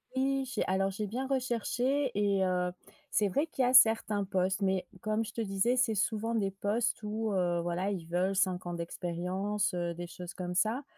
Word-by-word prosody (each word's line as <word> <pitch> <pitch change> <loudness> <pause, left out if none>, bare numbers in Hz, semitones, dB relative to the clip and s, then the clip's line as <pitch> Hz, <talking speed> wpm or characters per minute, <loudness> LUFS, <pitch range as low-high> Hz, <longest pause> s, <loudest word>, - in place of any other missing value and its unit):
Oui 270 0 +1
j'ai 260 - -2
alors 195 +1 +1
j'ai 210 +2 -3
bien 255 +6 -3
recherché 260 +1 0
et 200 -2 +2
heu, 180 -1 0 0.4
c'est 210 - +3
vrai 285 - 0
qu'il 270 - -1
y 245 - +3
a 250 - +1
certains 220 -4 +6
postes 190 +1 0
mais 190 -1 +1 0.2
comme 215 +1 0
je 210 - -8
te 230 - -3
disais 200 +4 +1
c'est 250 -3 +2
souvent 225 +3 0
des 195 -3 0
postes 210 +6 -1
où, 215 0 -2
heu, 175 -2 +1
voilà 175 +3 -1
ils 170 -4 -5
veulent 185 +3 0
5 185 -2 +1
ans 175 - -4
d'expérience, 180 +4 -2
heu, 175 -1 -2
des 175 +1 -6
choses 180 0 -8
comme 180 -1 -4
ça, 225 +8 +1
200 Hz, 200 wpm, -31 LUFS, 185-230 Hz, 0.4 s, certains